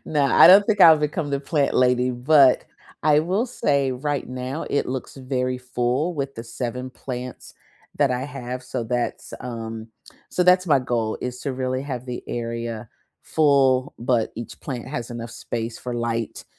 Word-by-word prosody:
No, 145 -2 +1
I 140 - +7
don't 195 +3 +9
think 210 -3 +1
I'll 160 -3 +9
become 150 0 -2
the 140 0 -1
plant 145 -1 0
lady, 125 0 +3
but 130 +2 +4 0.4
I 150 -1 +4
will 190 +10 0
say 140 - 0
right 145 +2 -3
now 130 +4 -4
it 140 - +1
looks 130 +2 -5
very 130 -1 -2
full 125 +6 -1
with 140 -2 -3
the 115 - -7
7 125 +2 -5
plants 125 -1 -7 0.4
that 140 -3 +3
I 125 - -1
have, 130 -3 -6
so 125 -2 -4
that's, 120 +1 -3
um 115 -2 -6 0.4
so 180 - +1
that's 180 +1 +5
my 145 -5 +4
goal 120 -3 -2
is 125 0 -5
to 140 - -3
really 130 0 -2
have 130 -3 -5
the 125 -1 -5
area 115 -1 -4 0.3
full, 140 -3 +2
but 120 -2 0
each 115 0 -8
plant 125 -3 -6
has 120 -4 -5
enough 115 -1 -6
space 115 0 -5
for 125 -1 -5
light, 115 -1 -3
130 Hz, 175 wpm, -23 LUFS, 120-145 Hz, 0.4 s, don't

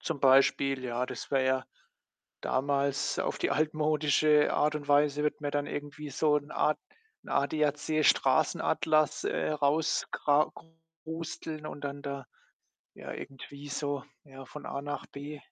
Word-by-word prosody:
Zum 160 -4 -3
Beispiel, 135 0 +4
ja, 125 0 -1
das - - -7
wäre 135 -2 +2
ja 130 0 +1 0.8
damals 140 +1 0
auf - - -1
die - - 0
altmodische 150 0 +3
Art 150 +1 +2
und 145 -1 -5
Weise 145 0 +3
wird 150 - 0
mir 145 - -1
dann 145 0 0
irgendwie 145 +1 -6
so 150 +2 +2
'n 145 0 -2
ad 155 - +2 0.5
'n - - -13
ADAC-Straßenatlas, 155 +1 +2
äh, - - 0
raus 150 +2 +1
kra 145 +1 +2 0.5
krusteln 160 -1 -6
und 145 - -6
dann 140 0 -5
da 140 -2 -5 0.7
ja, - - -8
irgendwie 140 +1 -9
so, 145 -2 -2 0.2
ja, 135 -2 -12
von 150 - -10
A 140 - -4
nach 145 +1 -5
B. 145 +1 -8
145 Hz, 145 wpm, -30 LUFS, 140-150 Hz, 0.8 s, Beispiel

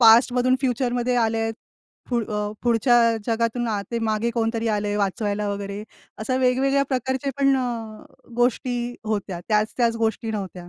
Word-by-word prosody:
पास्टमधून 245 +2 +6
फ्युचरमध्ये 245 -1 0
आले 225 -1 +2
आहे. 225 0 0 0.6
पुढ 235 -2 +1 0.4
पुढच्या 240 +1 +4 0.3
जगातून 230 +1 0
आ, 210 -2 0
ते 235 - -1
मागे 225 +1 0
कोणतरी 225 0 0
आलंय 205 0 -1
वाचवायला 205 +1 -1
वगैरे, 200 0 -4 0.4
अशा 255 +4 -1
वेगवेगळ्या 265 +2 +2
प्रकारचे 260 +2 -1
पण 275 -1 +4
अ, 230 -4 -4 0.3
गोष्टी 245 0 +1 0.3
होत्या. 200 -5 -2
त्याच-त्याच 225 +2 +1
गोष्टी 225 0 -1
नव्हत्या. 185 -4 -5
230 Hz, 135 wpm, -23 LUFS, 215-245 Hz, 0.6 s, पास्टमधून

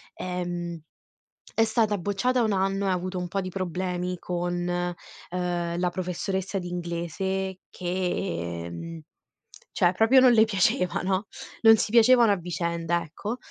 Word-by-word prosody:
ehm, 175 -2 -4 0.8
è 225 - +4
stata 220 -2 +1
bocciata 205 +7 +1
1 215 - +1
anno 195 +1 0
e - - +1
ha - - +3
avuto 185 +1 -3
un 180 0 -3
po' 195 +3 -2
di 185 - -4
problemi 180 -1 -3
con, 175 0 -2
ehm, 175 0 -3
la 180 0 +1
professoressa 190 +2 -3
di 175 - -6
inglese 180 +2 -3
che 175 - -3
mhmm, 165 - -7 0.7
cioè 180 -2 +3
proprio 225 +7 +5
non 255 -1 +7
le 220 -2 +6
piaceva, 185 -3 +1
no, 190 +2 0 0.4
non 225 -1 +8
si 215 - -1
piacevano 235 -1 +6
a - - +4
vicenda, 170 -1 -1
ecco. 205 +9 -5
180 Hz, 145 wpm, -26 LUFS, 175-195 Hz, 0.8 s, non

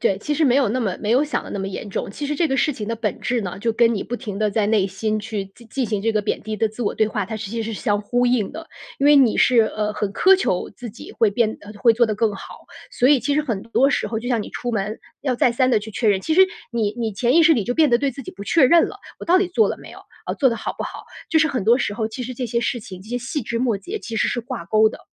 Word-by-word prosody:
对， 190 - +1
其 295 +8 -2
实 315 - +2
没 260 -1 +4
有 265 -6 +3
那 255 +4 -1
么 195 -5 -1
没 210 +1 -2
有 255 +5 +4
想 300 - -2
的 - - -9
那 200 - -4
么 195 - -3
严 195 - -6
重。 195 - -4
其 290 +8 -5
实 300 - -2
这 325 +1 +1
个 270 - 0
事 300 - +2
情 215 -4 -6
的 230 - -2
本 220 -2 -3
质 240 -1 0
呢， 185 -4 -5
就 230 0 0
跟 235 0 +3
你 205 - -2
不 245 - -4
停 210 -6 -6
地 215 0 +1
在 205 0 +1
内 210 -3 +2
心 215 +3 -2
去 210 -2 -4
进 220 +4 -18
进 255 0 -2
行 210 -2 -2
这 225 - +2
个 215 - +1
贬 210 - -2
低 215 0 -4
的 220 +1 +1
自 220 +3 -7
我 205 - 0
对 220 - +1
话， 210 -2 -2
它 220 +2 -5
是 205 -2 -6
其 230 -1 -2
实 225 +1 -4
是 - - -6
相 205 -1 +1
呼 245 +4 0
应 240 -5 +1
的。 325 0 -9 0.3
因 280 - +2
为 295 - +7
你 265 -6 +5
是， 245 -2 +5
呃， 215 -1 -1
很 210 -1 -3
苛 380 - +5
求 280 - -1
自 240 -2 -9
己 235 - -11
会 225 -3 +2
变 220 +1 0
呃， 205 +1 -11
会 230 +2 +4
做 235 +1 +3
得 215 -2 -2
更 220 -2 +1
好。 - - -11 0.2
所 250 - +2
以 285 -3 +5
其 285 - -1
实 300 - +2
很 225 -8 -3
多 235 +4 +2
时 - - 0
候 225 - -2
就 235 - -7
像 235 -4 +1
你 - - -9
出 245 -1 -4
门 210 +1 -2 0.2
要 260 -4 -1
再 240 - +3
三 255 +2 +2
地 225 - +4
去 210 +1 -8
确 225 - 0
认， 195 -2 +3
其 315 - -1
实 370 - +5 0.3
你 215 -3 0
你 225 -2 -2
潜 240 +6 +1
意 335 - +7
识 325 - +7
里 225 - 0
就 245 - -2
变 310 +2 +4
得 240 - +4
对 275 +3 0
自 275 +2 -9
己 - - -8
不 200 - -9
确 310 +7 +4
认 330 +6 +5
了- - - -9 0.2
我 - - -6
到 355 +2 +4
底 385 - +1
做 370 +5 +2
了 - - -3
没 - - -12
有？ - - -12 0.3
呃， - - -2
做 270 - +3
得 230 - -2
好 - - -4
不 - - -4
好？ - - -7 0.3
就 320 - +4
是 315 - +4
很 265 -8 -2
多 235 +5 +4
时 210 - -2
候， 220 0 -2
其 245 +3 -6
实 255 - -6
这 250 - -4
些 235 0 -1
事 240 0 -1
情、 185 -3 -10
这 200 - -14
些 245 +1 -2
细 265 +5 -3
枝 235 0 -3
末 230 -6 +1
节 410 - -6
其 225 -2 -6
实 - - +2
是 240 - -1
挂 240 -5 -6
钩 215 +4 +4
的。 - - -10
230 Hz, 355 characters per minute, -21 LUFS, 210-255 Hz, 0.3 s, 为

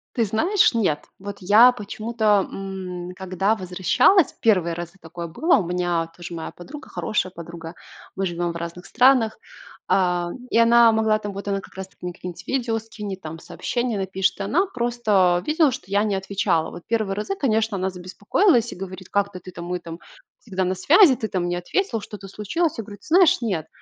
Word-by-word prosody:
Ты 230 - +2
знаешь, 335 - +2
нет. 190 -10 0
Вот 200 +1 -7
я 215 +7 +7
почему-то, 215 -2 0
м, 185 -2 -6
когда 190 +3 0
возвращалась, 190 - +3
первые 185 -7 +3
разы 170 0 -6
такое 170 0 -7
было, 320 - +2
у 190 - -1
меня 175 -2 -1
тоже 175 0 -8
моя 165 -1 -6
подруга, 290 +12 -11
хорошая 195 -3 -2
подруга- 170 -1 -9 0.4
мы 195 - -1
живем 175 -1 -2
в - - -10
разных 170 +1 -6
странах,- 250 -3 +3 0.5
а, 180 -2 +1 0.2
и - - +1
она 230 0 +6
могла 220 -1 +2
там, 205 -1 -5
вот 200 +1 -7
она 195 -1 -1
как - - -16
раз 190 0 -6
таки - - -32
мне 180 0 -5
какие-нибудь 180 0 -9
видео 240 -4 0
скинет 210 -4 -7
там, 160 0 -7
сообщения 240 +5 -3
напишет, 190 -1 -1
и - - -2
она 310 - +2
просто 220 - +1
видела, 310 -2 +3
что 225 - -7
я 200 +1 +2
не 210 -2 0
отвечала. 190 -4 0
Вот 175 - -10
первые 215 -4 0
разы, 215 - -3
конечно, 225 - 0
она 190 0 -1
забеспокоилась 205 - +1
и - - -11
говорит: 185 0 -8
"Как 200 0 0
ты 185 - -8
ты 185 +1 -11
там 170 -1 -8
мы 180 +1 -3
там 165 -1 -9 0.4
всегда 190 -4 -3
на 185 +1 -1
связи, 295 - +6
ты 220 -3 -4
там 180 -2 -1
не 175 - -1
ответила, 225 - -1
что-то 200 -1 -9
случилось?" 220 - -2
Я 225 - -4
говорю: 205 -1 -11
"Ты - - -19
знаешь, 345 -3 +5
нет, 185 -9 -2
195 Hz, 195 wpm, -23 LUFS, 180-230 Hz, 0.5 s, я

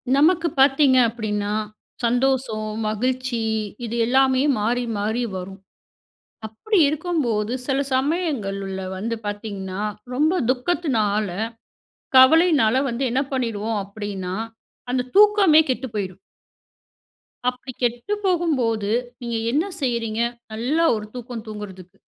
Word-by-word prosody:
நமக்கு 330 +3 +4
பார்த்தீங்க 270 -1 +5
அப்பிடின்னா, 210 -3 -2 0.5
சந்தோசோ, 245 -1 +1 0.3
மகிழ்ச்சி 250 +2 -1 0.4
இது 230 - -4
எல்லாமே 260 +1 +3 0.2
மாறி 240 +4 0
மாறி 220 +4 -1
வரும். 190 +2 -8 0.9
அப்பிடி 375 - 0
இருக்கும்போது, 280 -9 -1
சில 270 -1 +1
சமயங்கள்ல 250 - -1 0.2
வந்து 230 +4 -2
பார்த்தீங்கன்னா, 205 -2 -5 0.3
ரொம்ப 310 +7 +2
துக்கத்தினால, 250 - +1 0.9
கவலையினால 275 -3 +6
வந்து 235 +3 -2
என்ன 260 +3 +2
பண்ணிடுவோம் 225 -4 -1
அப்பிடின்னா, 200 -2 -5 0.6
அந்த 250 0 -1
தூக்கமே 405 -6 +6
கெட்டு 260 +1 -1
போய்டும். 190 -3 -3 1.3
அப்பிடி 250 +1 -8
கெட்டு 245 - -1
போகும்போது, 260 - +1 0.3
நீங்க 235 -1 -3
என்ன 300 +7 +1 0.2
செய்றீங்க? 230 -4 -1 0.3
நல்லா 270 +10 +1
ஒரு 210 -1 -5
தூக்கம் 240 -2 -7
தூங்குறதுக்கு. 195 -3 -9
240 Hz, 100 wpm, -22 LUFS, 210-275 Hz, 1.3 s, கவலையினால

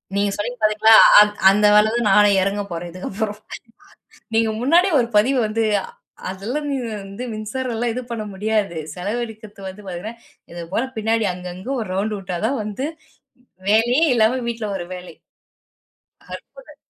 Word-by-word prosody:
நீங்க 200 0 +1
சொன்னீங்க 245 +4 -4
பாத்தீங்களா, 215 +1 +4 0.3
அந் 210 0 +6 0.2
அந்த 210 +2 +3
வேலை 210 +1 +6
தான் 235 -3 +1
நானே 205 +1 +6
இறங்க 195 +2 -1
போறேன் 170 +1 -5
இதுக்கு 185 +2 -7
அப்புறம். 210 +1 -4 1.0
நீங்க 225 0 +2
முன்னாடியே 340 +8 +3
ஒரு 235 - -1
பதிவு 255 +6 +3
வந்து 225 +1 -1 0.7
அதெல்லாம் 230 +11 -4 0.4
வந்து 195 +5 -8
மின்சாரம் 230 +3 -4
எல்லாம் 235 +1 -1
இது 255 - -4
பண்ண 225 -2 -4
முடியாது. 205 -3 -1 0.2
செலவழிக்கிறது 215 +2 -6
வந்து 200 +2 -11
பாத்தீங்கன்னா, 190 +5 -6 0.4
இது 170 0 -7
போல 230 - +1
பின்னாடி 220 0 0
அங்கங்க 180 +6 -8
ஒரு 220 - -5
ரவுண்ட் 210 +3 -1
விட்டா 185 -2 -5
தான் 265 -1 -1
வந்து, 215 +6 -4 0.8
வேலையே 240 +8 +3
இல்லாம 235 +3 +2
வீட்ல 230 -2 -3
ஒரு 175 - -6
வேலை. 180 0 -10 1.3
அற்புதம்! - - -17
215 Hz, 150 wpm, -21 LUFS, 195-235 Hz, 1.3 s, அந்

